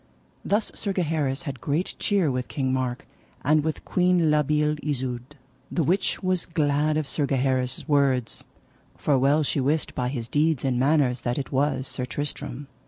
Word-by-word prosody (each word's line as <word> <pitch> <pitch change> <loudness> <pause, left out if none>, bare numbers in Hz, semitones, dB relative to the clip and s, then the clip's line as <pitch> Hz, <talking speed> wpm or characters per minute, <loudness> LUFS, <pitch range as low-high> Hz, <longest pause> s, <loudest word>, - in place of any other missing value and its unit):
Thus 205 +2 +1
Sir 200 -2 -3
Gaheris 155 -5 0
had 135 -6 -6
great 155 +6 -1
cheer 195 -8 +2
with 125 -1 -2
King 130 -2 -1
Mark, 130 -1 -2 0.4
and 150 +2 +3
with 155 0 -3
Queen 180 -3 +3
La 150 0 +4
Beale 150 +1 +1
Isoud, 130 -1 -3 0.3
the 170 - 0
which 185 +6 +1
was 185 -2 +1
glad 150 -2 +1
of 155 -2 -1
Sir 145 -1 0
Gaheris' 130 -1 0
words; 135 -5 +2 0.5
for 145 - +2
well 145 +4 +3
she 140 - 0
wist 145 +4 0
by 125 -1 -1
his 120 -4 -4
deeds 150 0 +1
and 125 -2 +1
manners 135 -3 +2
that 120 0 -1
it 140 - -4
was 135 -1 +1
Sir 125 - -2
Tristram. 145 0 -5
145 Hz, 170 wpm, -25 LUFS, 130-155 Hz, 0.5 s, La